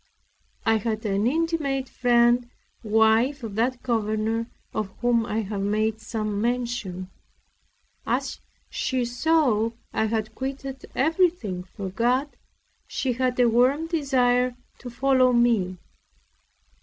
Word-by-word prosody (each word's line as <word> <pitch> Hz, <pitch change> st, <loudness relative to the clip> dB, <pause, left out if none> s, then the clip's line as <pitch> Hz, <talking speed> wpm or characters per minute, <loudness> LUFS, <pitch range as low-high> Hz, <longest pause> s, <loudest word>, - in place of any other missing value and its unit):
I 225 Hz, -1 st, +4 dB
had 220 Hz, 0 st, -3 dB
an 200 Hz, +2 st, +1 dB
intimate 295 Hz, -3 st, 0 dB
friend, 240 Hz, 0 st, +3 dB, 0.3 s
wife 225 Hz, +5 st, +3 dB
of 220 Hz, -3 st, -5 dB
that 240 Hz, +4 st, -1 dB
governor 225 Hz, -1 st, 0 dB, 0.3 s
of 215 Hz, -2 st, -2 dB
whom 235 Hz, -1 st, +2 dB
I 220 Hz, +1 st, -1 dB
have 200 Hz, -1 st, -4 dB
made 215 Hz, +2 st, 0 dB
some 215 Hz, -3 st, -3 dB
mention. 235 Hz, -6 st, -2 dB, 1.0 s
As -, -, -1 dB, 0.3 s
she 255 Hz, -3 st, -1 dB
saw 245 Hz, -3 st, +2 dB, 0.2 s
I 220 Hz, -, +1 dB
had 220 Hz, 0 st, -2 dB
quitted 270 Hz, +1 st, -6 dB
everything 320 Hz, -, +1 dB
for 190 Hz, +1 st, -7 dB
God, 250 Hz, +8 st, 0 dB, 0.5 s
she 260 Hz, -2 st, -1 dB
had 255 Hz, 0 st, -1 dB
a 245 Hz, -, +6 dB
warm 255 Hz, +7 st, +3 dB
desire 255 Hz, -6 st, +1 dB, 0.2 s
to 245 Hz, -, -8 dB
follow 255 Hz, +1 st, +3 dB
me. 225 Hz, -7 st, +2 dB
240 Hz, 120 wpm, -25 LUFS, 220-260 Hz, 1.0 s, a